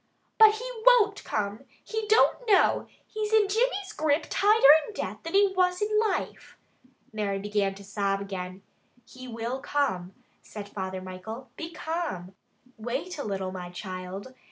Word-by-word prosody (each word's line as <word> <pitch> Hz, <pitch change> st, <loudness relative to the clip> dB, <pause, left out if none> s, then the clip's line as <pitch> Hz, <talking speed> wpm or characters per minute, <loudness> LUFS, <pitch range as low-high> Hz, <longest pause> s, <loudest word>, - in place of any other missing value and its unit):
"But 435 Hz, -1 st, +8 dB
he 480 Hz, +3 st, -6 dB, 0.2 s
won't 445 Hz, -5 st, +5 dB
come! 205 Hz, 0 st, -3 dB, 0.2 s
He 440 Hz, -1 st, -4 dB
don't 445 Hz, +3 st, +3 dB
know! 405 Hz, -3 st, +4 dB, 0.2 s
He's 430 Hz, -1 st, -4 dB
in 430 Hz, -2 st, +5 dB
Jimmy's 405 Hz, -2 st, 0 dB
grip 305 Hz, 0 st, +1 dB
tighter 410 Hz, -8 st, +6 dB, 0.2 s
in 430 Hz, -, -10 dB
death -, -, -4 dB
than 330 Hz, +3 st, -5 dB
he 400 Hz, -1 st, +4 dB
was 360 Hz, -1 st, +2 dB
in 425 Hz, 0 st, +1 dB
life." 435 Hz, -3 st, -2 dB, 0.6 s
Mary 205 Hz, -2 st, -1 dB
began 200 Hz, -1 st, -1 dB
to 200 Hz, -, -12 dB
sob 200 Hz, -1 st, -1 dB
again. 190 Hz, -1 st, -6 dB, 0.4 s
"He 255 Hz, 0 st, -11 dB
will 235 Hz, +2 st, -4 dB
come," 195 Hz, -11 st, -1 dB, 0.3 s
said 210 Hz, -2 st, -9 dB
Father 190 Hz, -2 st, -5 dB
Michael. 220 Hz, +7 st, -8 dB
"Be 330 Hz, +1 st, -6 dB
calm! 315 Hz, -, -4 dB, 0.4 s
Wait 265 Hz, +10 st, -4 dB
a -, -, -2 dB
little, 190 Hz, -2 st, -3 dB
my 180 Hz, -1 st, -7 dB
child. 185 Hz, +5 st, -7 dB
255 Hz, 155 wpm, -27 LUFS, -, 0.6 s, But